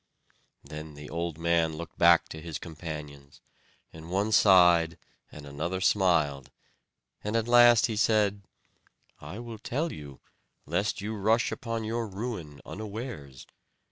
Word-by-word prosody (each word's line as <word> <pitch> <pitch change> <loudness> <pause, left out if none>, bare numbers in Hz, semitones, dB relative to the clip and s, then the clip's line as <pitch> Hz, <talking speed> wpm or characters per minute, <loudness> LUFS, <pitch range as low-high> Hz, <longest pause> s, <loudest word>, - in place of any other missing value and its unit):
Then 75 +1 -9
the 75 +1 -10
old 85 -1 -3
man 85 -1 +1
looked 85 0 -9
back 85 -1 +6
to 80 - -8
his 80 -1 -5
companions; 75 -4 -9 0.5
and 80 +1 -11
one 100 +4 0
sighed 90 -5 +5 0.3
and 75 - -11
another 75 +6 -4
smiled; 85 -9 +2 0.7
at 110 +2 -1
last 120 -1 +7
he 115 - -2
said: 105 -2 +2 0.8
"I 95 - -9
will 115 -2 -8
tell 150 +8 -2
you, 70 -3 -10 0.5
lest 90 +6 -1
you 105 +2 -4
rush 110 +3 +1
upon 115 -1 -4
your 115 +1 -2
ruin 95 -8 -6
unawares. 105 - -7
90 Hz, 130 wpm, -28 LUFS, 80-110 Hz, 0.8 s, last